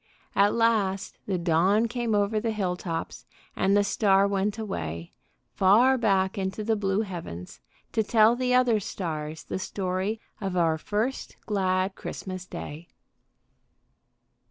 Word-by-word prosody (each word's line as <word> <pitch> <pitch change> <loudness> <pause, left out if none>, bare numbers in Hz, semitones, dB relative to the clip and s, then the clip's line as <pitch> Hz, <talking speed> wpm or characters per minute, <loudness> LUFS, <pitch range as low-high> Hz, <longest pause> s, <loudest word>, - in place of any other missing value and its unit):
At 200 +1 +4
last 215 -5 +1
the 190 -2 0
dawn 180 +6 +3
came 235 -2 -1
over 205 +1 +1
the 230 +1 -2
hill 195 -5 -1
tops, 170 -2 -5 0.3
and 195 +1 +3
the 205 - +4
star 200 -1 +3
went 200 +1 -1
away, 85 - -5 0.4
far 225 +8 +5
back 195 -4 +1
into 190 +3 -3
the 225 +1 +1
blue 200 0 0
heavens, 90 - -7 0.3
to 220 - +1
tell 220 +1 +4
the 250 0 -1
other 250 -3 +4
stars 160 -5 -5
the - - -4
story 190 +3 -2 0.2
of 190 -2 -2
our 165 -2 +2
first 220 +9 -2
glad 190 -2 0
Christmas 185 -1 -7
day. 160 0 -8
195 Hz, 135 wpm, -27 LUFS, 185-220 Hz, 0.4 s, far